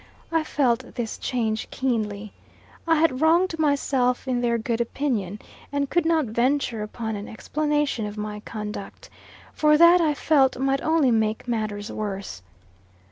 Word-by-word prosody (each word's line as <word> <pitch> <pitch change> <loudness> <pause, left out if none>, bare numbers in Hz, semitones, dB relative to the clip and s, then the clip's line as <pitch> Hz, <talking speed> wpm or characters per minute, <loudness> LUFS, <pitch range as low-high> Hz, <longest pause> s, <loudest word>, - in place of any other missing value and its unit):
I 325 -1 +2
felt 260 -5 0
this 230 -2 -4
change 225 -3 -2
keenly. 215 -5 -2 0.5
I 325 - +4
had 305 -4 +2
wronged 330 +1 +3
myself 275 -4 +1
in 250 -2 0
their 235 -1 +1
good 230 +1 -1
opinion; 230 -6 -2 0.3
and 285 -1 -1
could 345 -2 +2
not 325 -3 +2
venture 235 0 0
upon 220 +1 -4
an 205 +1 -6
explanation 295 -2 -1
of 210 +1 -8
my 210 0 -4
conduct; 210 -2 -7 0.4
for 300 0 +4
that, 340 +2 +7
I 305 -3 +2
felt, 275 -4 +3
might 270 +1 0
only 315 -5 +3
make 220 +1 0
matters 215 -3 -3
worse. 195 - -5
245 Hz, 145 wpm, -24 LUFS, 215-295 Hz, 0.5 s, that